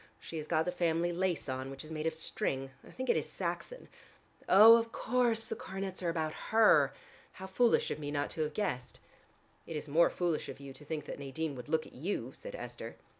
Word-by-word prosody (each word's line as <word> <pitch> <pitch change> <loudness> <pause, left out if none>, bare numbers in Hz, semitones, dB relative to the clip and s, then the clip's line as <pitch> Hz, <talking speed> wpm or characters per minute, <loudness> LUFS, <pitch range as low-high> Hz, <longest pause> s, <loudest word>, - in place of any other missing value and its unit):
She 165 - -7
has 155 -1 -5
got 160 -1 +2
the 180 - 0
family 175 -1 +1
lace 175 -4 -1
on, 130 0 -3
which 135 +3 -8
is 155 - -10
made 155 0 -2
of 160 - -1
string. 135 -4 -2
I - - -14
think 260 0 -5
it - - +4
is - - -1
Saxon. - - -4 0.6
Oh, 215 +5 +10
of 230 0 -2
course 235 -2 +1
the - - -3
coronets 190 -2 -5
are 175 - 0
about 160 -2 -1 0.2
her. 220 0 +6 0.4
How 190 - -8
foolish 230 +5 +2
of - - -3
me 145 -1 -4
not 145 0 -1
to 160 - -3
have 150 -1 -2
guessed." 125 -12 -3 0.7
"It 165 - -5
is 150 - -4
more 160 +4 +5
foolish 175 -3 -1
of - - -8
you 140 -1 -9
to 140 - -13
think 150 0 -4
that - - -7
Nadine 140 +3 -3
would 130 +2 -9
look 160 0 +1
at - - -14
you," 170 +10 -3
said - - -9
Esther. - - -7
160 Hz, 225 wpm, -32 LUFS, 150-190 Hz, 0.7 s, Oh